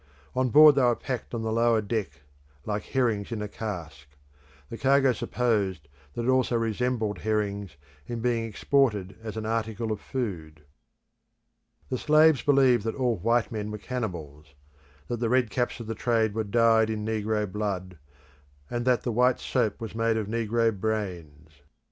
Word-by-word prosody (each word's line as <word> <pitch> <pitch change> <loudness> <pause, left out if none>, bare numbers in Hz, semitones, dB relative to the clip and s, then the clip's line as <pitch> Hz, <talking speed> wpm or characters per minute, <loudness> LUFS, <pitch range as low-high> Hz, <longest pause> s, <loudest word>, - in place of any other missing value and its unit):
On 130 0 +1
board 150 +3 +8
they 140 - +2
were 120 -1 +4
packed 125 -1 -5
on 115 - -3
the 110 - -2
lower 115 0 +3
deck 105 - -3 0.4
like 105 0 -2
herrings 115 -5 0
in 115 - -3
a 105 - -3
cask. 85 -10 -7 0.6
The 115 - -5
cargo 135 -1 +4
supposed 105 -10 -1 0.3
that 120 - -2
it - - -3
also 130 -1 +2
resembled 115 -1 -1
herrings, 100 -4 -2 0.3
in 120 -1 -4
being 115 -1 0
exported 105 -4 0
as 110 -1 -6
an 110 - -4
article 110 0 -2
of 105 - -3
food. 85 - -5 1.3
The 130 - -2
slaves 155 -1 +5
believed 135 -5 +4
that 115 - -2
all 125 -4 0
white 115 +5 +1
men 105 -2 -4
were 105 - -5
cannibals; 80 - -6 0.5
that 120 - -3
the 115 -1 0
red 125 -3 +2
caps 120 +2 -1
of 115 - -6
the 115 - -3
trade 110 -1 +1
were 110 0 -2
dyed 115 +1 +3
in 105 -1 -3
negro 110 -1 -1
blood, 95 -4 -4 0.7
and 120 0 -2
that 125 -1 +2
the 120 - -1
white 125 +3 +3
soap 120 -5 -1
was 115 -3 -6
made 115 0 +1
of 110 - -1
negro 115 +1 0
brains. 85 -8 -5
110 Hz, 165 wpm, -27 LUFS, 105-120 Hz, 1.3 s, board